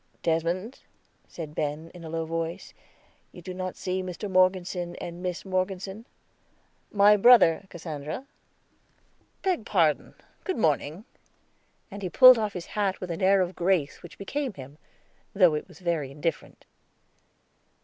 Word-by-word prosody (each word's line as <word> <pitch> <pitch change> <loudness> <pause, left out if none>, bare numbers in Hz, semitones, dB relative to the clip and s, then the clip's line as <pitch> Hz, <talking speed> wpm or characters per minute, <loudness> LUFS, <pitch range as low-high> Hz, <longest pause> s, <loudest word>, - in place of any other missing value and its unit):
"Desmond," 170 +8 -1 0.5
said 155 -3 -8
Ben 150 +2 -3
in 175 -2 -11
a 160 - -7
low 165 0 -2
voice, 165 +3 -4 0.6
"you - - -12
do 180 +1 -7
not 185 0 -5
see 185 0 -2
Mr. 185 +2 -5
Morgeson 185 -1 +1
and 170 +1 -7
Miss 180 0 -4
Morgeson. 190 +3 -3 0.9
My 205 0 +6
brother, 200 -5 +6
Cassandra." 155 - -6 1.2
"Beg 370 - 0
pardon, 165 -9 +1 0.3
good 375 - -2
morning"; 160 +1 0 0.9
and 200 +1 -8
he 185 - -3
pulled 255 +3 +8
off 210 -2 -2
his 180 -2 -6
hat 200 -2 0
with 180 -2 -5
an 165 - -5
air 195 +1 +4
of 180 0 -2
grace 175 -5 0
which 175 - -12
became 265 +5 -3
him, 140 +3 -11 0.6
though 180 -5 +5
it 150 - -3
was - - -16
very 170 -6 -2
indifferent. 150 +4 -4
180 Hz, 140 wpm, -27 LUFS, 165-195 Hz, 1.2 s, pulled